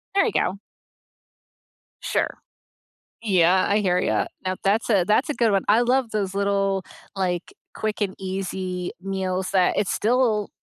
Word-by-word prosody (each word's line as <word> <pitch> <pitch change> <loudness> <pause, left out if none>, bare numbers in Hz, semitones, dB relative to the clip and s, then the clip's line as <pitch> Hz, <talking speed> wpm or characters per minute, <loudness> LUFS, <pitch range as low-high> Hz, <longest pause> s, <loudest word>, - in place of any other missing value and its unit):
There 390 - +4
you 445 - 0
go. 190 +2 0 1.4
Sure. - - -1 0.8
Yeah. 185 -4 +3
I 205 +1 +2
hear 180 -3 +2
you. - - +1 0.2
Now 185 - 0
that's 210 +5 +1
a 195 -5 +4
that's 215 +8 +2
a - - +1
good 230 -5 +2
one. 195 -1 +2
I 220 +4 +5
love 245 -1 +1
those 195 -3 -2
little, 195 -1 +1 0.3
like, 180 -2 -2 0.2
quick 215 0 -3
and 190 -2 -1
easy 185 -1 -4
meals 190 -1 -2
that 185 -2 +2
it's 200 - +1
still 225 -3 +1
195 Hz, 150 wpm, -23 LUFS, 185-215 Hz, 1.4 s, I